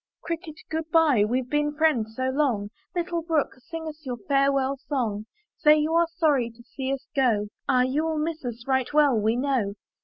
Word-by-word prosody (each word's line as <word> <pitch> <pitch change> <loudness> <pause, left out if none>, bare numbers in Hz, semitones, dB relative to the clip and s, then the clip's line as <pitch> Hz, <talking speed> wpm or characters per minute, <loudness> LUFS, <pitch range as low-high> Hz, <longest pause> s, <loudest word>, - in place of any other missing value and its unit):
"Cricket, 335 -2 -5 0.2
good 320 0 -3
by, 310 -9 +4
weVe 245 +4 0
been 295 +2 0
friends 250 -9 +1
so 260 +1 0
long, 245 -8 0 0.2
Little 345 -1 -1
brook, 320 -3 0
sing 320 +6 -7
us 310 0 -8
your 250 -3 -4
farewell 275 +3 +1
song; 230 -7 -3 0.3
Say 300 0 +6
you 305 +1 0
are 335 0 +4
sorry 280 -7 +2
to 235 +1 -17
see 265 +2 -4
us 275 -1 -3
go; 225 -6 +2 0.2
Ah, 255 -2 +4
you 270 +5 0
will 320 -1 -1
miss 315 0 -2
us, 240 -1 -6
right 265 -2 +1
well 290 -4 +5
we 220 +1 +2
know." 245 -6 0
275 Hz, 190 wpm, -26 LUFS, 245-310 Hz, 0.3 s, Say